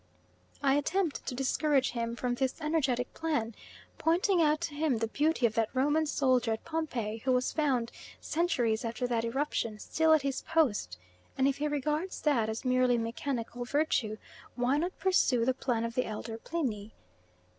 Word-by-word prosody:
I 270 Hz, -1 st, +4 dB
attempt 335 Hz, +2 st, -1 dB
to 250 Hz, -, -2 dB
discourage 270 Hz, +1 st, +1 dB
him 235 Hz, -1 st, -3 dB
from 245 Hz, 0 st, -1 dB
this 260 Hz, +1 st, -1 dB
energetic 275 Hz, -6 st, 0 dB
plan, 295 Hz, -9 st, -1 dB, 0.5 s
pointing 350 Hz, +2 st, +3 dB
out 305 Hz, -1 st, +3 dB
to 335 Hz, -3 st, -3 dB
him 290 Hz, -4 st, +1 dB
the 225 Hz, -, 0 dB
beauty 295 Hz, +2 st, +1 dB
of 225 Hz, -, +2 dB
that 225 Hz, -1 st, +1 dB
Roman 295 Hz, +4 st, +2 dB
soldier 255 Hz, -5 st, +2 dB
at 220 Hz, -, -6 dB
Pompeii 250 Hz, -10 st, -2 dB
who 260 Hz, +4 st, 0 dB
was 250 Hz, 0 st, +1 dB
found, 260 Hz, -7 st, 0 dB, 0.3 s
centuries 250 Hz, -10 st, 0 dB
after 235 Hz, +2 st, -2 dB
that 235 Hz, -2 st, 0 dB
eruption, 230 Hz, -3 st, -1 dB
still 320 Hz, +8 st, +1 dB
at 310 Hz, -3 st, +3 dB
his 275 Hz, -1 st, -1 dB
post; 240 Hz, -, +1 dB, 0.4 s
and 265 Hz, -, +3 dB
if 275 Hz, -, 0 dB
he 300 Hz, -, -1 dB
regards 300 Hz, +5 st, -2 dB
that 240 Hz, -8 st, +2 dB
as 220 Hz, +4 st, -4 dB
merely 255 Hz, -1 st, +3 dB
mechanical 235 Hz, +1 st, -3 dB
virtue, 245 Hz, -5 st, 0 dB, 0.4 s
why 255 Hz, +4 st, +1 dB
not 350 Hz, +4 st, -3 dB
pursue 265 Hz, -11 st, +2 dB
the 260 Hz, -, +2 dB
plan 245 Hz, -3 st, -1 dB
of 230 Hz, -, -4 dB
the 250 Hz, -, 0 dB
elder 225 Hz, +1 st, -5 dB
Pliny? 225 Hz, -10 st, -3 dB
260 Hz, 170 wpm, -30 LUFS, 230-300 Hz, 0.5 s, I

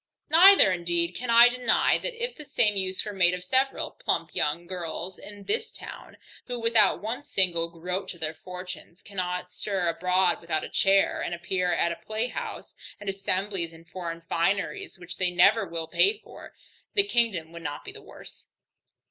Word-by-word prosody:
Neither 360 Hz, -, +8 dB
indeed 175 Hz, -1 st, -1 dB
can 245 Hz, +6 st, -5 dB
I 235 Hz, +1 st, +9 dB
deny, 245 Hz, -1 st, +2 dB
that -, -, -4 dB
if 480 Hz, +1 st, -3 dB
the 305 Hz, -, -9 dB
same 215 Hz, -7 st, +2 dB
use 190 Hz, 0 st, -2 dB
were 210 Hz, -, -5 dB
made 180 Hz, -2 st, +3 dB
of 180 Hz, -, -8 dB
several 260 Hz, +8 st, 0 dB
plump -, -, -2 dB
young 170 Hz, +4 st, -1 dB
girls 175 Hz, 0 st, -6 dB
in 205 Hz, -1 st, -11 dB
this 440 Hz, -, -1 dB
town, -, -, -11 dB, 0.3 s
who 245 Hz, -1 st, -4 dB
without 230 Hz, -4 st, +3 dB
one 230 Hz, +5 st, -3 dB
single 180 Hz, -, 0 dB
groat 180 Hz, +3 st, -4 dB
to 175 Hz, -, -7 dB
their 160 Hz, -1 st, -3 dB
fortunes, 180 Hz, 0 st, -9 dB
cannot 180 Hz, -2 st, -4 dB
stir 190 Hz, -4 st, -2 dB
abroad 180 Hz, +1 st, +1 dB
without 165 Hz, -2 st, -2 dB
a -, -, -6 dB
chair, 195 Hz, 0 st, +2 dB
and 175 Hz, -, -3 dB
appear 180 Hz, +1 st, -1 dB
at 170 Hz, 0 st, +1 dB
a 170 Hz, -, -8 dB
playhouse 220 Hz, +3 st, -4 dB, 0.3 s
and 205 Hz, -1 st, -5 dB
assemblies 195 Hz, -3 st, -2 dB
in 165 Hz, 0 st, -15 dB
foreign 170 Hz, -1 st, -6 dB
fineries 200 Hz, -, -1 dB
which 180 Hz, 0 st, -8 dB
they 185 Hz, -1 st, +2 dB
never 175 Hz, 0 st, +4 dB
will 165 Hz, -1 st, -4 dB
pay 405 Hz, -, +3 dB
for, -, -, -14 dB, 0.4 s
the 400 Hz, -, +6 dB
kingdom 215 Hz, -, 0 dB
would 170 Hz, 0 st, -9 dB
not 145 Hz, -2 st, -6 dB
be -, -, -7 dB
the -, -, -12 dB
worse. -, -, -12 dB
185 Hz, 180 wpm, -27 LUFS, 170-220 Hz, 0.4 s, I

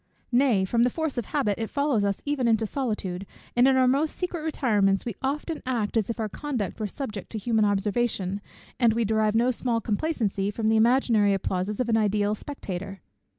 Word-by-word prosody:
Nay, 240 Hz, -6 st, +3 dB
from 230 Hz, +5 st, +1 dB
the 245 Hz, -, +4 dB
force 315 Hz, -1 st, -2 dB
of 235 Hz, -, -4 dB
habit, 230 Hz, -8 st, -1 dB
it 225 Hz, -, -3 dB
follows 280 Hz, -7 st, +1 dB
us 200 Hz, -1 st, -1 dB
even 285 Hz, -4 st, 0 dB
into 225 Hz, -1 st, +3 dB
solitude, 205 Hz, -7 st, -3 dB, 0.3 s
and 245 Hz, +2 st, +5 dB
in 265 Hz, -, +4 dB
our 255 Hz, -1 st, +4 dB
most 280 Hz, +5 st, +1 dB
secret 355 Hz, -2 st, -3 dB
retirements 210 Hz, -11 st, +1 dB
we 235 Hz, -, -3 dB
often 300 Hz, +4 st, -2 dB
act 240 Hz, -5 st, -2 dB
as 220 Hz, -2 st, +1 dB
if 230 Hz, -, -3 dB
our 220 Hz, -, 0 dB
conduct 245 Hz, -4 st, -4 dB
were 215 Hz, -, -1 dB
subject 215 Hz, -3 st, -6 dB
to -, -, -2 dB
human 220 Hz, 0 st, +1 dB
observation, 205 Hz, -1 st, 0 dB, 0.4 s
and 235 Hz, -3 st, +4 dB
we 230 Hz, 0 st, +1 dB
derive 215 Hz, 0 st, +1 dB
no 240 Hz, +3 st, +3 dB
small 240 Hz, -1 st, -1 dB
complacency 215 Hz, -4 st, -1 dB
from 220 Hz, +1 st, -1 dB
the 220 Hz, -, +3 dB
imaginary 220 Hz, -3 st, +4 dB
applauses 190 Hz, +2 st, -2 dB
of 250 Hz, -, 0 dB
an 225 Hz, -1 st, +3 dB
ideal 210 Hz, -1 st, +1 dB
spectator." 195 Hz, -6 st, -6 dB
225 Hz, 195 wpm, -26 LUFS, 205-255 Hz, 0.4 s, and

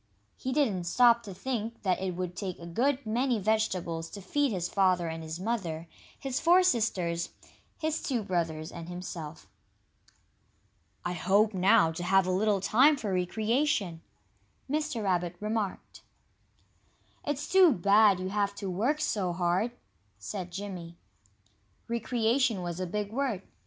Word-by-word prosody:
He 260 Hz, -, -4 dB
didn't 225 Hz, -11 st, +1 dB
stop 235 Hz, +5 st, +5 dB
to 205 Hz, -4 st, -8 dB
think 230 Hz, +1 st, -4 dB
that 185 Hz, -2 st, +1 dB
it 185 Hz, -2 st, -2 dB
would 180 Hz, 0 st, -4 dB
take 185 Hz, -3 st, -4 dB
a 170 Hz, -, -10 dB
good 255 Hz, +10 st, 0 dB
many 240 Hz, +3 st, +1 dB
vegetables 185 Hz, -6 st, -1 dB
to 200 Hz, -, -8 dB
feed 280 Hz, +8 st, 0 dB
his 180 Hz, -4 st, -1 dB
father 185 Hz, -3 st, +2 dB
and 165 Hz, 0 st, -4 dB
his 160 Hz, +1 st, -6 dB
mother, 180 Hz, -7 st, -3 dB, 0.3 s
his 270 Hz, -2 st, -2 dB
four 350 Hz, +3 st, +5 dB
sisters, 185 Hz, -, 0 dB, 0.5 s
his 315 Hz, 0 st, -1 dB
two 245 Hz, -6 st, -1 dB
brothers, 165 Hz, -4 st, -2 dB
and 170 Hz, 0 st, -8 dB
himself. 170 Hz, -3 st, -7 dB, 1.6 s
"I 175 Hz, -, -1 dB
hope, 200 Hz, +5 st, +2 dB
now, 190 Hz, -1 st, +4 dB
to 165 Hz, -, -6 dB
have 190 Hz, +1 st, +4 dB
a 185 Hz, -, 0 dB
little 200 Hz, +2 st, +2 dB
time 270 Hz, +9 st, +5 dB
for 210 Hz, -7 st, -3 dB
recreation," 210 Hz, -, 0 dB, 0.7 s
Mr. 295 Hz, -5 st, -1 dB
Rabbit 180 Hz, -2 st, 0 dB
remarked. 210 Hz, -2 st, -3 dB, 1.2 s
"It's 290 Hz, 0 st, -3 dB
too 370 Hz, -3 st, +6 dB
bad 200 Hz, -1 st, +4 dB
you 185 Hz, 0 st, -3 dB
have 200 Hz, 0 st, 0 dB
to 195 Hz, -2 st, -4 dB
work 245 Hz, +12 st, 0 dB
so 190 Hz, -, 0 dB
hard," 180 Hz, +6 st, +1 dB, 0.5 s
said 180 Hz, -, -5 dB
Jimmy. 175 Hz, -3 st, -7 dB, 0.9 s
"Recreation" 235 Hz, -2 st, +1 dB
was 175 Hz, 0 st, -4 dB
a 185 Hz, -, -2 dB
big 205 Hz, +3 st, -3 dB
word. 235 Hz, -6 st, -1 dB
200 Hz, 145 wpm, -29 LUFS, 175-235 Hz, 1.6 s, too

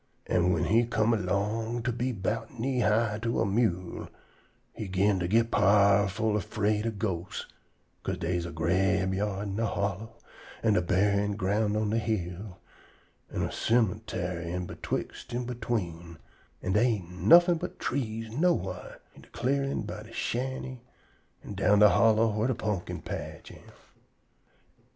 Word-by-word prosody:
An' 90 Hz, 0 st, +2 dB
whin 85 Hz, -3 st, +1 dB
he 115 Hz, +3 st, +4 dB
come 115 Hz, 0 st, +2 dB
erlong 110 Hz, +4 st, -1 dB
to 125 Hz, -, 0 dB
be 125 Hz, +2 st, -1 dB
'bout 115 Hz, +3 st, -3 dB
knee 130 Hz, +2 st, 0 dB
high 110 Hz, -1 st, +2 dB
to 115 Hz, 0 st, -1 dB
a -, -, +2 dB
mewel, 95 Hz, -4 st, -1 dB, 0.6 s
he 110 Hz, -, -5 dB
'gin 95 Hz, +1 st, +2 dB
to 90 Hz, -, -1 dB
git 115 Hz, +4 st, +2 dB
powerful 100 Hz, +1 st, +3 dB
'fraid 105 Hz, +3 st, 0 dB
ob 110 Hz, -2 st, -3 dB
ghosts, 95 Hz, -4 st, -3 dB, 0.6 s
'ca'se -, -, -2 dB
dey's 85 Hz, 0 st, -1 dB
a -, -, -7 dB
grabeyard 95 Hz, +4 st, 0 dB
in 100 Hz, -2 st, -4 dB
de 115 Hz, -, +1 dB
hollow, 100 Hz, +3 st, -3 dB, 0.5 s
an' 110 Hz, -2 st, +4 dB
a 90 Hz, -, +3 dB
buryin' 100 Hz, +3 st, +1 dB
ground 105 Hz, +2 st, 0 dB
on 105 Hz, -1 st, 0 dB
de 115 Hz, -, +2 dB
hill, 95 Hz, -3 st, -3 dB, 0.7 s
an' -, -, -2 dB
a -, -, -2 dB
cemuntary 90 Hz, -6 st, 0 dB
in 90 Hz, 0 st, -3 dB
betwixt 120 Hz, -, -5 dB
an' 125 Hz, 0 st, -2 dB
between, 90 Hz, -9 st, -4 dB, 0.5 s
an' 95 Hz, -, -1 dB
dey 105 Hz, -, +4 dB
ain't 90 Hz, -4 st, -9 dB
nuffin' 175 Hz, 0 st, +7 dB
but -, -, -6 dB
trees 115 Hz, -4 st, -3 dB
nowhar 170 Hz, +8 st, -1 dB
in -, -, -15 dB
de -, -, -18 dB
clearin' 140 Hz, 0 st, -1 dB
by 105 Hz, 0 st, -6 dB
de 110 Hz, +1 st, -13 dB
shanty 130 Hz, +2 st, -3 dB, 0.6 s
an' -, -, -7 dB
down 100 Hz, +1 st, +3 dB
de 105 Hz, 0 st, +8 dB
hollow 115 Hz, +1 st, +4 dB
whar 110 Hz, +3 st, 0 dB
de 130 Hz, -, 0 dB
pumpkin 105 Hz, -5 st, -3 dB
patch -, -, -6 dB
am. -, -, -15 dB
105 Hz, 155 wpm, -29 LUFS, 95-115 Hz, 0.7 s, de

